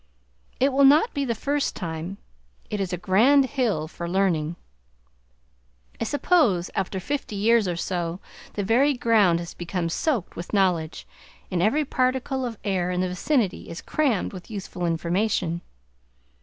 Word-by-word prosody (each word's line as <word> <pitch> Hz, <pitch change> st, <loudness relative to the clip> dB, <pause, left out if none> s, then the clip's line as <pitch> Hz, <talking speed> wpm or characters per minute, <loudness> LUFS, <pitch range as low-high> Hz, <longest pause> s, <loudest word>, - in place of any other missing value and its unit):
It 270 Hz, +1 st, +3 dB
will 280 Hz, +1 st, +4 dB
not 295 Hz, -, +6 dB
be 280 Hz, -1 st, -1 dB
the 235 Hz, -3 st, -1 dB
first 285 Hz, +5 st, -1 dB
time; 170 Hz, +2 st, -5 dB, 0.5 s
it 210 Hz, -, -2 dB
is 190 Hz, -2 st, -2 dB
a 180 Hz, -, -1 dB
grand 230 Hz, -, +4 dB
hill 235 Hz, -, -1 dB
for 170 Hz, +1 st, -6 dB
learning! 175 Hz, -4 st, +1 dB, 1.4 s
I -, -, -1 dB
suppose 245 Hz, -, +2 dB
after 190 Hz, 0 st, -2 dB
fifty 275 Hz, +1 st, -3 dB
years 220 Hz, +1 st, +3 dB
or 175 Hz, -, -1 dB
so 175 Hz, 0 st, -3 dB, 0.3 s
the 205 Hz, -, -2 dB
very 260 Hz, +8 st, +3 dB
ground 215 Hz, -8 st, +4 dB
has 170 Hz, 0 st, -6 dB
become 175 Hz, -1 st, -3 dB
soaked 235 Hz, -, -1 dB
with 175 Hz, -, -7 dB
knowledge, 180 Hz, -5 st, +1 dB, 0.5 s
and 180 Hz, -2 st, 0 dB
every 285 Hz, +11 st, +2 dB
particle 260 Hz, 0 st, 0 dB
of 230 Hz, -2 st, -7 dB
air 185 Hz, -3 st, 0 dB
in 180 Hz, 0 st, 0 dB
the 185 Hz, -, 0 dB
vicinity 210 Hz, +2 st, 0 dB
is 165 Hz, -, -6 dB
crammed 265 Hz, -13 st, 0 dB
with 180 Hz, -2 st, -10 dB
useful 190 Hz, -4 st, -4 dB
information. 170 Hz, +1 st, 0 dB
195 Hz, 155 wpm, -25 LUFS, 175-255 Hz, 1.4 s, not